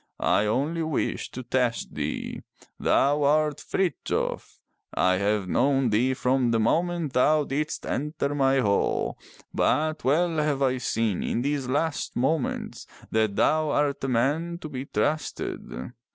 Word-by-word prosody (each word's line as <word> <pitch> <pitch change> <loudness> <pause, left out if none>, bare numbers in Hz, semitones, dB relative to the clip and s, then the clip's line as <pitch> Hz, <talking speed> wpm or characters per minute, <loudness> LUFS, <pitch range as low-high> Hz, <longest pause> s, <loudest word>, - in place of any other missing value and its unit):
I 105 - +3
only 145 +9 0
wished 160 -3 -2
to 130 - -5
test 125 -1 -1
thee. - - -4 0.4
Thou 145 +2 +3
art 150 +1 +2
Frithjof. 180 -8 -2 0.4
I 95 0 +3
have 100 0 0
known 135 +3 +2
thee 125 +5 +2
from 125 -1 +1
the 115 -1 +2
moment 165 +5 0
thou 150 +4 +4
didst 150 +3 -3
enter 145 0 -2
my 135 -1 +3
hall, 100 -3 0 0.3
but 155 +1 +1
well 160 +5 +2
have 150 -2 +1
I 130 -1 +1
seen 115 -5 0
in 120 - -1
these 140 -2 -1
last 145 +4 -1
moments 135 +3 -1 0.2
that 110 -2 +1
thou 155 +5 +2
art 145 -1 0
a - - 0
man 145 +8 0
to 155 - -6
be 135 -2 -5
trusted. 120 - -3
135 Hz, 140 wpm, -26 LUFS, 125-155 Hz, 0.4 s, thou